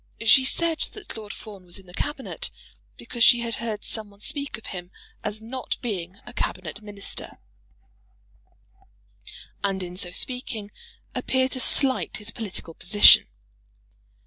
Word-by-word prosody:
She 260 +3 +8
said 330 +4 +1
that 420 - -8
Lord 215 -2 -7
Fawn 205 -4 -10
was 175 +1 -7
in 195 - -13
the 180 - -14
Cabinet 290 - -4 0.5
because 235 -2 -1
she 240 0 +7
had 235 -1 -3
heard 220 -3 -3
some 215 -2 -2
one 200 0 -20
speak 280 +6 -1
of 225 - -15
him 180 -1 -7 0.3
as 215 +1 -4
not 255 +3 -3
being 190 -5 -4
a 240 - -10
Cabinet 185 -1 -3
Minister, 205 -1 -6 2.3
and 195 -1 0
in 175 0 -7
so 180 -1 -2
speaking 220 -1 -2 0.4
appear 260 0 +1
to 255 - -4
slight 260 0 +4
his 215 +1 -2
political 200 -7 -4
position. 205 +6 +7
215 Hz, 145 wpm, -25 LUFS, 195-250 Hz, 2.3 s, She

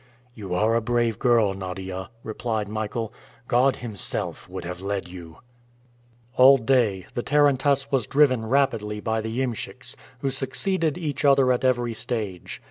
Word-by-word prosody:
"You 100 -6 -5
are 110 +5 +2
a 115 - +2
brave 120 -1 0
girl, 115 -5 +3
Nadia," 95 0 -6
replied 110 -1 -3
Michael. 110 +1 -4 0.3
"God 130 +2 +3
Himself 110 -6 -5
would - - -6
have 90 +1 -6
led 100 -1 -3
you." 85 -2 -11 1.0
All 135 +2 +8
day 110 -6 +1
the 120 - -2
tarantass 140 -1 +2
was 130 -5 +1
driven 135 -5 +3
rapidly 115 -6 +1
by 110 +1 -1
the 110 +3 -4
iemschiks, 120 -5 -5 0.3
who 135 - 0
succeeded 160 +4 -1
each 150 -6 -3
other 135 -2 +5
at 125 - 0
every 120 -2 +1
stage. 110 -6 -5
115 Hz, 145 wpm, -24 LUFS, 105-135 Hz, 1.0 s, All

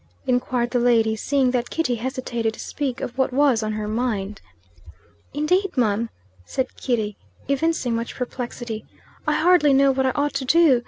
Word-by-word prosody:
inquired 245 -1 0
the 245 - +2
lady, 230 -2 +3
seeing 265 +3 +1
that 245 -1 -1
Kitty 325 -7 0
hesitated 240 -2 -2
to - - -15
speak 275 -5 -3
of 240 - -4
what 265 - +2
was 265 -3 +3
on 215 0 -2
her 215 0 -3
mind. 215 -3 -2 0.9
"Indade, 360 +5 0
mum," 225 -1 +1 0.3
said 260 - -3
Kitty, 220 -5 -1 0.3
evincing 280 -2 0
much 230 0 -4
perplexity, 240 -3 -5 0.4
"I 300 - +3
hardly 325 -3 +4
know 275 0 +5
what 265 0 +1
I - - +2
ought 290 0 0
to 275 -1 -2
do. 310 -3 +5
250 Hz, 165 wpm, -23 LUFS, 230-280 Hz, 0.9 s, know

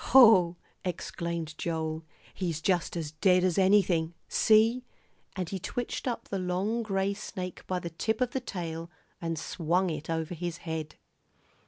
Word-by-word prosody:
"Hoh!" 215 -9 +7 0.3
exclaimed 170 -3 -3
Joel, 160 -1 -2 0.3
"he's 170 -5 -2
just 175 0 +1
as 155 -3 -3
dead 180 +3 +4
as 185 0 +2
anything. 185 -4 +3
See!" 225 +3 +4 0.5
and 185 -2 -2
he 190 +2 -4
twitched 245 +8 -3
up 240 - -2
the 195 - -1
long 185 +6 0
gray 195 -2 0
snake 185 -2 -6
by 185 - 0
the 170 -1 -5
tip 220 +7 -1
of 250 -1 +1
the 265 - -1
tail 170 -8 -5 0.3
and 165 -1 -2
swung 175 +4 0
it 155 0 -5
over 160 +1 -1
his 175 0 -4
head. 160 -2 -4
180 Hz, 155 wpm, -29 LUFS, 165-195 Hz, 0.5 s, Hoh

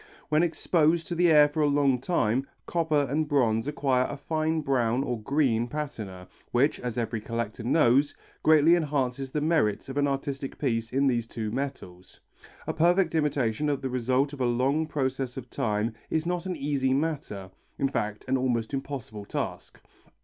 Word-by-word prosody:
When 155 +1 +3
exposed 165 -1 +2
to - - -2
the 175 0 +3
air 150 -1 +7
for 145 +2 -2
a 150 - +4
long 140 -3 +2
time, 135 -4 0 0.2
copper 160 -4 +1
and 150 +4 0
bronze 120 -5 +2
acquire 135 -4 +1
a 145 - -5
fine 155 +2 -1
brown 130 -3 +1
or 120 -5 -3
green 120 -3 +1
patina 110 -10 -6 0.2
which, 130 +5 +2
as 125 -2 -4
every 115 -2 -2
collector 115 0 -4
knows, 135 +2 +3 0.3
greatly 155 +1 +6
enhances 140 -5 -1
the 150 +3 -2
merits 150 -8 +1
of 135 - -5
an 145 0 +3
artistic 140 0 -3
piece 115 -5 -1
in 135 +2 +2
these 120 -4 +1
two 110 -2 -4
metals. 100 -9 -6 0.5
A - - -2
perfect 175 +1 +3
imitation 145 -3 0
of 140 -2 -1
the 130 - -2
result 130 +3 +1
of 140 - -6
a - - +2
long 135 +6 +1
process 130 -3 -2
of 125 -2 -8
time 110 +1 -1 0.2
is 160 0 0
not 180 +1 -2
an 180 - -2
easy 135 -3 0
matter, 135 -11 -3 0.3
in 135 - +1
fact 105 -5 -3
an 130 +1 +2
almost 120 -2 -1
impossible 135 -7 -5
task. - - -5
135 Hz, 175 wpm, -27 LUFS, 120-150 Hz, 0.5 s, air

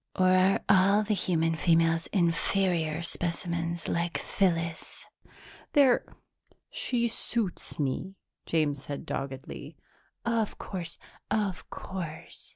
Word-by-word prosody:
Or 185 0 +4
are 185 +1 +4
all 200 +2 +5
the 210 0 0
human 165 -4 +1
females 165 0 +3
inferior 170 -2 +1
specimens 170 0 -2
like 170 0 0
Phyllis?" 165 -4 -1 0.7
"They're 275 -5 +5 0.7
she 235 -2 0
suits 230 -3 -1
me," 150 +7 -2 0.3
James 150 -4 +1
said 145 -1 -6
doggedly. 140 +2 -6 0.5
"Of 230 -2 0
course, 175 -3 -5 0.3
of 200 -4 -1
course. 170 -5 -7
170 Hz, 100 wpm, -29 LUFS, 165-195 Hz, 0.7 s, all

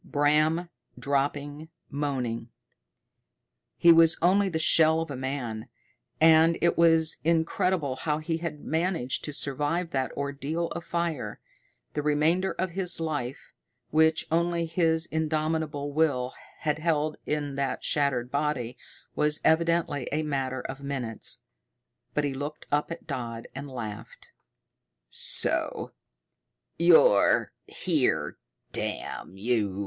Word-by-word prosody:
Bram 155 +4 +2 0.3
dropping, 145 +2 -2 0.2
moaning; 125 -5 -3 1.3
he 170 - +7
was 165 0 +6
only 195 +3 +3
the 165 - -2
shell 160 0 +5
of 165 -2 -5
a - - -4
man, 125 -4 -4 0.5
and 160 +1 +6
it 170 - +2
was 165 -1 +4
incredible 165 -3 +1
how 150 +2 -1
he 160 +1 -2
had 160 -3 -5
managed 160 -5 -1
to 150 - -4
survive 150 +4 -1
that 130 -3 -1
ordeal 140 +4 -3
of 170 - -6
fire. 170 -5 -3 0.5
The 150 - -1
remainder 155 +6 +1
of 185 -1 -2
his 180 -1 -1
life, 145 -6 -4 0.4
which 160 +1 +3
only 170 0 +1
his 160 0 +1
indomitable 155 -2 -1
will 140 -5 +1 0.3
had 150 -1 0
held 155 -2 0
in 145 -2 -2
that 135 -2 -2
shattered 130 -4 0
body, 140 -4 -2 0.4
was 150 0 +1
evidently 165 -4 +1
a 155 +2 0
matter 135 -3 -2
of 135 +2 -7
minutes, 130 -5 -5 0.7
but 150 - +1
he 140 -1 -1
looked 145 +3 -6
up 145 +1 +1
at 165 - -7
Dodd 115 -2 -5
and 140 +2 -7
laughed. 110 -4 -8 0.8
"So - - +3 0.9
you're 165 - +5 0.2
here, - - 0 0.3
damn 95 - -4
you!" 105 -3 -1
150 Hz, 120 wpm, -27 LUFS, 135-165 Hz, 1.3 s, he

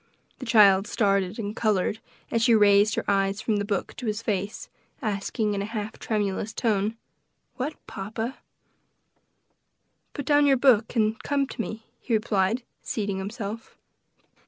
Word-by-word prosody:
The 255 - -7
child 200 -3 +6
started 195 -2 +1
and 210 -2 -4
colored, 215 -1 +1 0.3
as 230 - +1
she 230 0 +5
raised 205 0 +5
her - - -2
eyes 195 0 +1
from 220 -1 0
the 205 - 0
book 200 -2 -3
to 245 - -5
his 215 +1 -2
face, 200 -1 -2 0.3
asking, 215 -2 -1
in 200 - -2
a - - -2
half 215 0 -5
tremulous 210 0 -2
tone, 215 -1 0 0.6
"What, 280 +4 -3
papa?" 220 +6 -5 1.7
"Put 285 - -5
down 290 0 +4
your 270 -1 +5
book 245 -3 +3
and 220 -1 +1
come 280 -1 0
to 250 - -5
me," 220 0 -6
he 235 - 0
replied, 215 +1 +1 0.2
seating 200 -3 -2
himself. 210 +2 -6
215 Hz, 150 wpm, -26 LUFS, 200-230 Hz, 1.7 s, child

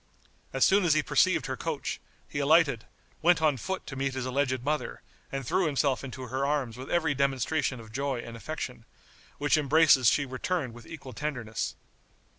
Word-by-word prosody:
As 135 - +3
soon 200 +1 +4
as 165 -4 +4
he 155 - +2
perceived - - +3
her - - -3
coach, - - -4 0.3
he - - -4
alighted, - - +4 0.4
went 175 +1 +5
on 155 -3 +3
foot 190 - -4
to 135 - -7
meet 135 0 -2
his 130 -1 -2
alleged 130 -1 0
mother, 150 +2 -2 0.3
and 135 -1 -4
threw 180 +5 +1
himself 140 -2 +1
into 130 -1 -7
her 130 +2 -2
arms 140 -5 0
with 130 +2 -8
every 160 -4 +2
demonstration 140 0 0
of 110 -1 -12
joy 135 +1 -2
and 115 -1 -8
affection, 125 -2 -6 0.5
which 145 +1 +2
embraces 150 -3 +5
she 140 - +1
returned 130 +1 -2
with 120 -1 -13
equal 135 -6 -9
tenderness. 120 -5 -3
135 Hz, 180 wpm, -28 LUFS, 130-155 Hz, 0.5 s, went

